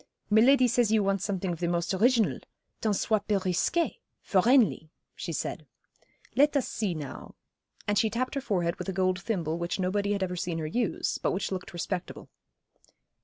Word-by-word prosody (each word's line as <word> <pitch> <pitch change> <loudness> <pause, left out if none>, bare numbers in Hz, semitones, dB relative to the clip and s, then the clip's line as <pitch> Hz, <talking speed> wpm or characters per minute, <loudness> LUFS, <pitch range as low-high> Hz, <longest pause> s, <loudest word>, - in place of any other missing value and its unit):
'Miladi 250 +4 +6
says 240 -2 +2
you 220 -2 +3
want 195 -1 +1
something 190 -2 -2
of 165 - -8
the 175 - 0
most 170 +2 0
original 230 +3 +3 0.4
tant 215 -2 +1
soit 210 +1 0
peu 210 -2 +2
risqué 190 - 0 0.2
for 190 -3 +3
'Enley,' 215 - +3 0.2
she - - -5
said. - - -4 0.7
'Let 290 +1 +4
us 270 - 0
see 200 -6 -2
now,' 145 -4 -8 0.5
and 205 0 +2
she 220 - +2
tapped 245 +4 -2
her 275 - -2
forehead 175 -8 -1
with - - -5
a - - -2
gold 185 0 +1
thimble 170 -7 -2
which 170 +3 -2
nobody 200 +2 0
had 200 -1 -1
ever 180 -1 -2
seen 175 -1 -3
her 160 - -3
use, 220 +8 -1
but - - 0
which 190 +2 -2
looked 185 -1 -5
respectable. 175 +1 -5
195 Hz, 185 wpm, -28 LUFS, 180-225 Hz, 0.7 s, Miladi